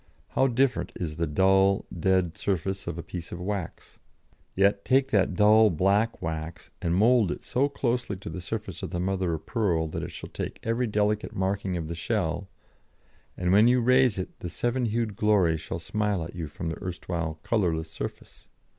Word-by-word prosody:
How 135 - +2
different 130 +1 +1
is 80 -4 -4
the 85 -1 0
dull, 95 +4 +3
dead 90 -1 +1
surface 95 +2 -2
of - - -3
a 85 - -5
piece 85 -2 -7
of 85 - -6
wax. 95 -1 -5 0.6
Yet 100 +1 +3
take 135 +1 +3
that 95 -2 +2
dull, 110 +2 +6
black 100 +6 +1
wax 80 +1 -5
and 85 -2 0
mould 110 0 +4
it - - -5
so 140 +3 +1
closely 125 -6 -1
to 95 - -8
the 90 - -5
surface 105 -1 -5
of - - -4
the 85 - -3
mother 95 -2 0
of 80 0 -9
pearl 90 -9 0
that - - -4
it - - -5
shall - - -9
take - - -5
every 115 +2 0
delicate 105 0 0
marking 95 -1 -1
of 80 -2 -4
the 85 - -4
shell, 90 0 -2 0.9
and 90 0 0
when 105 +4 +6
you 125 +1 +4
raise 125 -2 +4
it 90 - -6
the 90 - -5
seven 120 +8 -1
hued 115 -2 -1
glory 100 -6 +3
shall 80 +1 -5
smile 105 +1 -1
at 80 - -8
you 85 -3 -4
from 80 +3 -5
the 80 - -6
erstwhile 85 -3 -3
colourless 85 -8 0
surface. - - -8
95 Hz, 190 wpm, -27 LUFS, 85-110 Hz, 0.9 s, dull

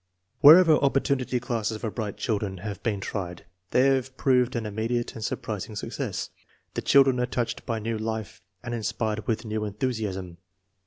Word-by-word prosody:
Wherever 160 +2 +9
" - - -4
opportunity 135 -2 +1
classes 115 -3 -2
" - - -15
for 110 -2 -3
bright 105 -3 -4
children 105 -4 -2
have 100 -2 -5
been 105 -4 -1
tried 90 -4 -5 0.2
they 125 - +3
have 130 -1 +1
proved 125 -1 +2
an 115 -2 -2
immediate 115 +3 -2
and 110 - -7
surprising 110 0 -4
success. - - -4 0.4
The - - -2
children 135 -2 +5
are 125 - +1
touched 120 -1 -3
by 115 - -1
new 110 0 -3
life 110 -2 -4 0.2
and 120 -1 -4
inspired 110 -1 -2
with 115 0 -1
new 110 0 -2
enthusiasm. 100 -5 -3
115 Hz, 170 wpm, -26 LUFS, 105-125 Hz, 0.4 s, Wherever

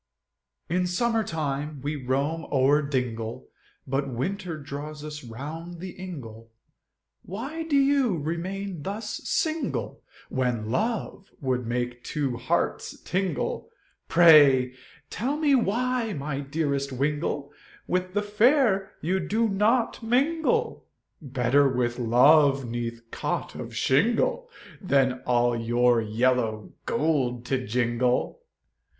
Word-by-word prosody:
In 180 +2 0
summer 225 +5 +1
time 150 -4 -3
we 145 +2 -2
roam 140 +4 -1
o'er 140 +2 +4
dingle, 125 -5 -3 0.4
But 135 +1 -1
winter 175 - -3
draws 145 +1 -7
us 150 -1 -7
round 155 +9 -7
the 185 +1 -6
ingle, 120 -13 -9 0.7
Why 265 - -6
do 310 -3 0
you 275 -7 +3
remain 175 +3 -4
thus 210 +6 -4
single, 320 -1 -1 0.3
When 120 -4 -1
love 215 - -2
would 125 -4 -1
make 120 0 -3
two 135 -5 -2
hearts 160 +8 -1
tingle, 180 -6 -2 0.4
Pray, 145 -7 +6 0.4
tell 270 +6 -1
me 300 -2 +3
why 240 -1 +1
my 140 -2 -3
dearest 140 -1 -2
wingle, 145 +1 -2 0.3
With 185 +1 -2
the 205 - +1
fair 210 -2 +3
you 185 +4 0
do 215 +6 +1
not 220 +6 +1
mingle, 320 - +1 0.3
Better 135 0 +2
with 125 -1 -1
love 135 +3 +5
'neath 115 0 -4
cot - - -3
of - - -7
shingle, 230 - +2 0.3
Than 135 -8 +2
all 120 -1 +3
your 120 +1 +2
yellow 110 -1 0
gold 130 -6 0
to 130 -2 -1
jingle. 125 - 0
150 Hz, 115 wpm, -26 LUFS, 125-195 Hz, 0.7 s, Pray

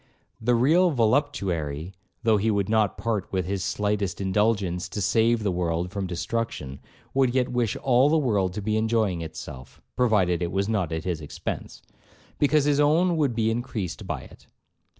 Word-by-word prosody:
The 120 +2 +2
real 160 +10 +4
voluptuary, 95 - 0 0.3
though 110 -2 +4
he 105 +3 +1
would 100 -3 +1
not 110 -2 +1
part 110 -5 -2
with 95 -2 -1
his 95 0 -2
slightest 105 -3 -1
indulgence 95 -2 0
to - - -5
save 115 +3 +2
the 100 - +1
world 85 0 -1
from 100 -2 -3
destruction, 85 - -3 0.3
would 130 -2 +2
yet 125 -1 +2
wish 120 -4 0
all 130 +2 +3
the 160 - +3
world 105 - +1
to 105 - -4
be 110 +1 0
enjoying 110 -5 +1
itself, 70 -5 -9 0.2
(provided 95 -8 +2
it 85 -1 -1
was 100 +1 0
not 100 -7 -1
at 80 0 -3
his 85 -4 -2
expence), 75 - -6 0.6
because 145 0 +3
his 145 -1 +2
own 165 +4 +3
would 145 -7 +1
be 110 -1 +1
increased 115 -6 -4
by - - -3
it. - - -16
105 Hz, 170 wpm, -25 LUFS, 90-120 Hz, 0.6 s, real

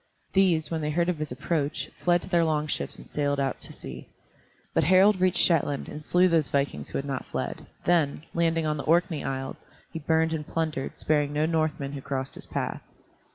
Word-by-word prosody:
These, 170 -6 +3
when 160 -1 -1
they 150 - -1
heard 170 +3 +1
of 175 -4 -1
his 155 -3 -3
approach, 145 +3 -2
fled 175 -1 +2
to - - -7
their 170 -2 +3
long 155 -2 +1
ships 150 - -2
and - - -12
sailed 145 -1 -1
out 135 -2 -1
to - - +2
sea. - - -9 0.7
But - - +3
Harald 185 +3 +5
reached 185 -1 +3
Shetland 145 -4 +2
and 150 - -7
slew 180 +4 +4
those 165 -5 +2
vikings 140 0 -1
who - - -3
had 135 - -3
not 135 -2 -4
fled, - - -4 0.2
then, 160 -4 +2
landing 165 -1 +1
on 150 0 0
the 140 - -5
Orkney 165 -2 +2
Isles, 135 0 -4 0.3
he 165 - -3
burned 160 +1 +2
and 150 -2 -4
plundered, 155 -5 -2
sparing 145 -1 +1
no 150 +1 +2
Northman 155 -4 0
who 140 -1 -6
crossed 135 0 -3
his - - -8
path. - - -3
155 Hz, 205 wpm, -27 LUFS, 145-170 Hz, 0.7 s, Harald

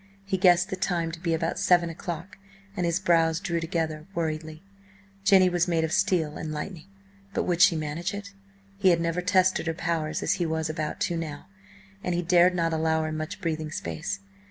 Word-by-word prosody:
He 195 -1 -1
guessed 180 -1 +4
the - - 0
time 175 -3 -1
to 165 - -8
be 165 -1 0
about 165 +1 -2
seven 175 -2 +3
o'clock, 175 +5 -7 0.4
and 180 -3 0
his 170 +1 +1
brows 165 -3 +3
drew 170 -3 -1
together 160 -1 -3
worriedly. 160 0 -3 0.6
Jenny 190 -2 +6
was 175 -1 +1
made 165 -2 +1
of 160 - -1
steel 180 -6 +1
and 160 - -5
lightning, 155 +3 -6 0.5
but - - +1
would 175 -1 0
she 170 - +7
manage 155 +4 -3
it? 200 -1 -7 0.5
He 190 -2 +5
had 170 -2 +4
never 170 +1 -1
tested 185 -2 +2
her 165 - -1
powers 160 -2 -2
as - - +2
he - - +2
was 160 0 -1
about 155 -1 -4
to 175 - 0
now, 155 -3 -5 0.6
and 180 - -1
he 175 - 0
dared 180 +1 +5
not 165 -2 +1
allow 160 0 +1
her 155 - -2
much 155 +6 -5
breathing 160 -3 -2
space. 95 - -4
170 Hz, 200 wpm, -27 LUFS, 160-180 Hz, 0.6 s, she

